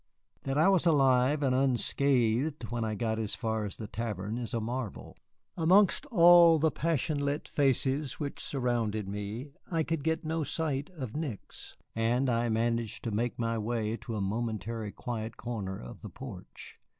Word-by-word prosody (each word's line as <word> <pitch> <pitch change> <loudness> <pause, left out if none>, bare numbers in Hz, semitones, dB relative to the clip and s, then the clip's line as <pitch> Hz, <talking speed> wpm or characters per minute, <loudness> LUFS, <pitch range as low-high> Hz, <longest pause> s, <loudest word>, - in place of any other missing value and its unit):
That 135 +1 -1
I 155 - +5
was 190 -3 +4
alive 135 -1 +4
and 130 -2 +2
unscratched 130 0 +1
when 120 -1 -1
I 110 -1 -2
got 110 +1 -1
as 110 -1 -1
far 110 -2 -2
as 100 - -4
the 110 - -6
tavern 105 0 -4
is 120 - -4
a - - +1
marvel. 115 -1 -5 0.4
Amongst 190 - +4
all 175 - +7
the 160 +1 +2
passion 155 -1 0
lit 145 +1 -2
faces 135 0 +1
which 145 -2 -4
surrounded 115 -6 -1
me 105 +7 -5 0.2
I 165 -2 +1
could 165 -2 -2
get 160 +2 -1
no 160 +1 -1
sight 145 -1 -2
of 140 -11 -7
Nick's, 150 -10 -6 0.2
and 120 +3 +1
I 120 0 +1
managed 115 0 -1
to 115 - -2
make 115 +3 -1
my 115 -1 -1
way 110 0 -1
to 115 - -6
a 105 - -2
momentarily 110 +1 -3
quiet 115 -2 -5
corner 105 -5 -4
of - - -10
the - - -7
porch. - - -10
120 Hz, 170 wpm, -30 LUFS, 110-145 Hz, 0.4 s, all